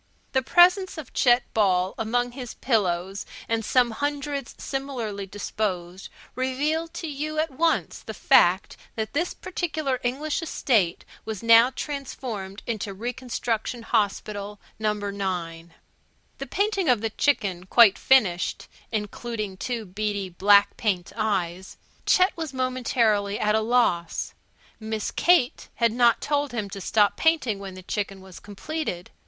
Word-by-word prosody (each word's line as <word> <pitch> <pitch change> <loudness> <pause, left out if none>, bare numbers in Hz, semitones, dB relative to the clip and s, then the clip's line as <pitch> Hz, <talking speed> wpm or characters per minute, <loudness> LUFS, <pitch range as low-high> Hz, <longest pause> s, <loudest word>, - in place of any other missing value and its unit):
The 265 - +2
presence 360 +6 +4
of 310 - -8
Chet 245 -1 +4
Ball 190 -3 +2
among 245 +2 -1
his 245 -2 -8
pillows 195 -5 0 0.2
and 225 0 0
some 245 +2 +3
hundreds 285 +2 -3
similarly 240 -8 -4
disposed 190 -2 -4 0.2
revealed 295 +6 -1
to 330 - -4
you 305 +1 -4
at 310 0 0
once 325 +5 0
the - - -8
fact - - +3 0.2
that 220 -1 -3
this 335 +5 -1
particular 315 -7 -2
English 285 +6 -2
estate 220 - 0 0.2
was 220 -2 -6
now 230 +1 +7
transformed 255 -8 -6
into 210 -4 -4
Reconstruction 235 0 -3
Hospital 205 -2 -1 0.2
No. 215 -1 +1
9. 185 -5 -4 0.6
The 275 - -5
painting 395 - 0
of 240 -4 +3
the 225 -1 -2
chicken 195 -10 0
quite 225 -2 +6
finished 200 -10 +2 0.2
(including 215 -1 -4
two 230 +3 -4
beady 200 0 -3
black 200 +3 +4
paint 190 -6 -1
eyes) 190 -4 -2 0.3
Chet 370 +1 +4
was 315 -5 -5
momentarily 235 -5 +1
at 210 0 +2
a 220 - +2
loss. 215 -8 +1 0.5
Miss 220 -1 -3
Kate 345 -8 +2
had 235 -1 +2
not 235 0 +3
told 285 -2 -1
him 210 -4 -3
to 195 - -6
stop 205 +1 +2
painting 305 -11 +2
when 195 -2 -8
the 185 - -10
chicken 200 0 -3
was 190 -2 -12
completed. 205 - -5
225 Hz, 135 wpm, -25 LUFS, 200-265 Hz, 0.6 s, now